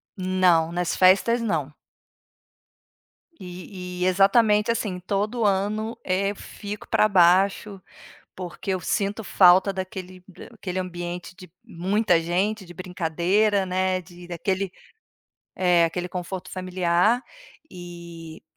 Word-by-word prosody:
Não, 185 -3 +2
nas 175 0 -1
festas 195 +6 +4
não. 155 -10 -2 1.7
E 180 0 -8
e - - +2
exatamente 210 +3 +4
assim, 200 -5 -3
todo 210 +5 -2
ano, 210 +3 0
eh, 195 +2 0
eu - - -8
fico 205 +1 -8
para 215 - +4
baixo, 195 +1 +3 0.5
porque 180 +1 -6
eu 185 - -3
sinto 200 +4 -1
falta 185 +1 +5
daquele 185 -1 -7 0.3
aquele 190 -4 -5
ambiente 175 0 -5
de 185 -2 -13
muita 190 -2 +1
gente, 190 +5 -1
de 175 -1 -13
brincadeira, 185 +4 0
né, 185 0 0
de 175 +1 -14
daquele, 185 +2 -2 0.8
é, 175 -2 +3
aquele 180 +2 -2
conforto 180 +1 -6
familiar. 185 +5 +1 0.5
E 170 -2 -10
185 Hz, 115 wpm, -24 LUFS, 175-200 Hz, 1.7 s, falta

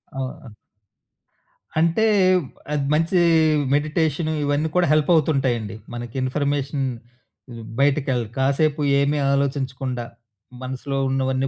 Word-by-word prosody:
అవు 135 0 -2 0.2
ఆహ్ 120 - -11 1.3
అంటే 170 +6 +2 0.7
అది 145 -2 0
మంచి 165 +4 +1 0.6
మెడిటేషను 155 +1 0
ఇవన్నీ 145 +2 0
కూడా 180 -2 +3
హెల్పవుతుంటాయండి. 140 - +1 0.2
మనకి 120 0 -7
ఇన్‌ఫర్‌మేషన్ 140 +1 -1 0.6
హ్మ్. 115 -1 -9 0.2
బయటికెళ్ 135 -3 +2
కాసేపు 145 +3 +1 0.2
ఏమి 145 +1 +1
ఆలోచించకుండా 130 -3 -2 0.6
మనసులో 130 +2 -4
ఉన్నవన్నీ 130 0 0
140 Hz, 95 wpm, -22 LUFS, 130-150 Hz, 1.3 s, కూడా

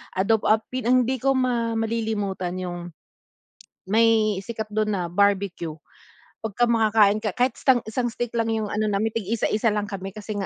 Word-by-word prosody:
adobo 205 +3 +1
ap 215 +1 +3 0.2
ang 250 +1 +4
hindi 260 0 -1
ko 270 +2 +2
ma 240 -3 0
malilimutan 215 -5 -2
yung, 175 -1 -6 1.0
may 220 -1 +3
sikat 220 0 -6
dun 215 0 0
na 175 -3 -3
Barbeque, 200 -2 +1 0.8
pagka 235 +3 0
makakain 215 -2 +4
ka 210 - -1
kahit 255 +1 +1
istang 255 -3 +3
isang 245 +2 -1
stick 240 -1 -3
lang 225 0 +1
yung 215 -2 -2
ano 215 +1 -1
namin 205 +2 0
tig 225 -4 -3
isa-isa 220 -1 +1
lang 205 -1 -2
kami 195 -1 -6
kasi 215 0 -6
nga, 195 - -2
215 Hz, 170 wpm, -24 LUFS, 200-230 Hz, 1.0 s, ang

